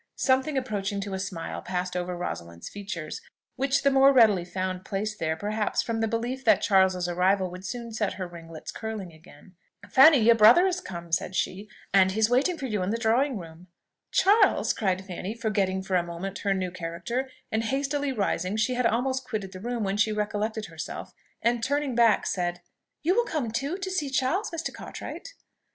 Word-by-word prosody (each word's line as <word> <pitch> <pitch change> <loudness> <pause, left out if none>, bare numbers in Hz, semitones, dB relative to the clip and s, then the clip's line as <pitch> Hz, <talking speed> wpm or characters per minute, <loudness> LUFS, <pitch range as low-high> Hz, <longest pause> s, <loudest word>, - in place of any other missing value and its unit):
Something 265 +2 +1
approaching 205 -6 -2
to 200 -1 -5
a 190 - -2
smile 190 -4 -5
passed 180 0 -3
over 180 0 -2
Rosalind's 85 - -6
features, 195 -6 -6 0.3
which 270 +1 +1
the 280 - +4
more 270 +1 +6
readily 220 -9 +5
found 185 +1 -4
place 210 +3 -3
there, 160 -4 -1
perhaps, 210 +4 -1
from 230 -1 -2
the 225 - +1
belief 240 +4 -3
that - - +4
Charles's 190 -3 +3
arrival 185 +1 +1
would 180 +1 -9
soon 235 +4 -5
set 215 -2 -1
her 185 -2 -5
ringlets 165 -2 -9
curling 215 -6 -6
again. 160 +2 -17 0.3
"Fanny, 280 +6 +8
your 235 -1 +6
brother 230 - +7
is 365 -1 0
come," 170 - -8
said 180 +2 -1
she, 195 +3 -2 0.2
"and 190 -1 +5
he 215 - -2
is 220 +2 +3
waiting 290 +8 +2
for 275 - -5
you 215 -6 -1
in 185 - -1
the 225 - 0
drawing 235 +3 +2
room." 165 0 -11 0.4
"Charles?" 405 +4 +4
cried 190 -2 -1
Fanny, 190 +3 -5
forgetting 200 -4 0
for 190 - -5
a 180 - +4
moment 175 +3 -6
her 200 -1 0
new 185 -1 -2
character; 185 +10 -4 0.2
and 220 +1 0
hastily 280 +2 -1
rising 200 -4 -1
she 220 +4 +1
had 250 -1 +2
almost 260 +3 0
quitted 215 -6 -4
the 185 - -9
room, 235 +2 -3
when 195 0 -1
she 220 +1 +3
recollected 210 +1 -2
herself, 165 -3 -7 0.3
and 235 0 +1
turning 285 +1 0
back, 230 -2 +4
said, 175 -1 -2 0.4
"You 345 +4 +3
will 475 - +4
come 290 - -2
too, 275 +10 -2
to 380 -1 -4
see 305 -7 -1
Charles, 270 +11 0
Mr. 330 -1 -4
Cartwright?" - - -8
210 Hz, 195 wpm, -27 LUFS, 185-255 Hz, 0.4 s, Fanny